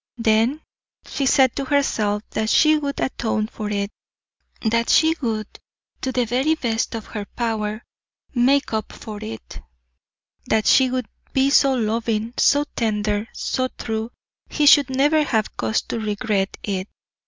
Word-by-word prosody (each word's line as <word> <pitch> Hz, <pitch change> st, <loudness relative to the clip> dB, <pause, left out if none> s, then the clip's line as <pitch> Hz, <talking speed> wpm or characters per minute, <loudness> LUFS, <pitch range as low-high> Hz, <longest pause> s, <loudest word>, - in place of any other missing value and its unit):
Then, 230 Hz, +6 st, +2 dB, 0.4 s
she 275 Hz, -, -2 dB
said 265 Hz, -3 st, +4 dB
to 275 Hz, -, -2 dB
herself 215 Hz, -7 st, 0 dB
that 220 Hz, 0 st, -1 dB
she 310 Hz, +5 st, +5 dB
would 285 Hz, -2 st, -3 dB
atone 220 Hz, -4 st, -1 dB
for 215 Hz, -1 st, -6 dB
it, 200 Hz, 0 st, -2 dB, 0.7 s
that 230 Hz, +1 st, +1 dB
she 320 Hz, 0 st, +4 dB
would 220 Hz, -4 st, -1 dB, 0.6 s
to 260 Hz, -, -2 dB
the 250 Hz, -1 st, +1 dB
very 260 Hz, +7 st, +1 dB
best 230 Hz, -6 st, -2 dB
of 225 Hz, -, -6 dB
her 210 Hz, -2 st, -6 dB
power 220 Hz, -2 st, -2 dB, 0.5 s
make 270 Hz, +1 st, +2 dB
up 220 Hz, 0 st, -3 dB
for 215 Hz, -2 st, -8 dB
it; 110 Hz, 0 st, -8 dB, 0.9 s
that 220 Hz, -1 st, +1 dB
she 260 Hz, -2 st, +5 dB
would 255 Hz, -2 st, -2 dB, 0.3 s
be 270 Hz, +1 st, +3 dB
so 275 Hz, -2 st, +4 dB
loving, 225 Hz, 0 st, -1 dB
so 285 Hz, 0 st, +4 dB
tender, 210 Hz, -1 st, -1 dB
so 255 Hz, 0 st, -1 dB
true, 220 Hz, 0 st, -3 dB, 0.4 s
he 300 Hz, -, 0 dB
should 285 Hz, -2 st, +7 dB
never 290 Hz, +4 st, +3 dB
have 220 Hz, -7 st, -1 dB
cause 110 Hz, -1 st, -1 dB
to 230 Hz, -, -4 dB
regret 210 Hz, -2 st, -1 dB
it. 195 Hz, -2 st, -3 dB
230 Hz, 150 wpm, -22 LUFS, 215-265 Hz, 0.9 s, should